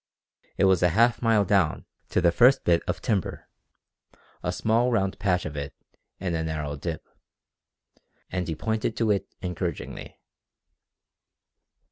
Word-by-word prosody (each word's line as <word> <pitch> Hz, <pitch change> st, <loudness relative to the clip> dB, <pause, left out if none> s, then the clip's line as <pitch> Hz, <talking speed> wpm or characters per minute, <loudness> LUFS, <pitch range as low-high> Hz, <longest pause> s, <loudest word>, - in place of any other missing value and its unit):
It -, -, +2 dB
was 95 Hz, -2 st, +4 dB
a 90 Hz, -, +4 dB
half 120 Hz, +1 st, +4 dB
mile 115 Hz, -3 st, +3 dB
down 95 Hz, -5 st, +1 dB, 0.2 s
to -, -, +1 dB
the 85 Hz, -, +4 dB
first 125 Hz, +9 st, +5 dB
bit 85 Hz, -1 st, +3 dB
of -, -, -3 dB
timber 100 Hz, -6 st, -2 dB, 0.9 s
a -, -, -1 dB
small 115 Hz, +3 st, +1 dB
round 95 Hz, -4 st, 0 dB
patch 90 Hz, -3 st, +1 dB
of 75 Hz, -1 st, -5 dB
it 70 Hz, -1 st, -5 dB, 0.4 s
in 90 Hz, -2 st, -2 dB
a 80 Hz, -1 st, -1 dB
narrow 75 Hz, -2 st, -3 dB
dip 80 Hz, +2 st, -5 dB, 1.2 s
and 90 Hz, -1 st, -2 dB
he 80 Hz, -, -2 dB
pointed 110 Hz, +4 st, -2 dB
to 115 Hz, -3 st, +2 dB
it 100 Hz, -, 0 dB, 0.2 s
encouragingly. 90 Hz, -3 st, -5 dB
95 Hz, 140 wpm, -26 LUFS, 80-110 Hz, 1.2 s, first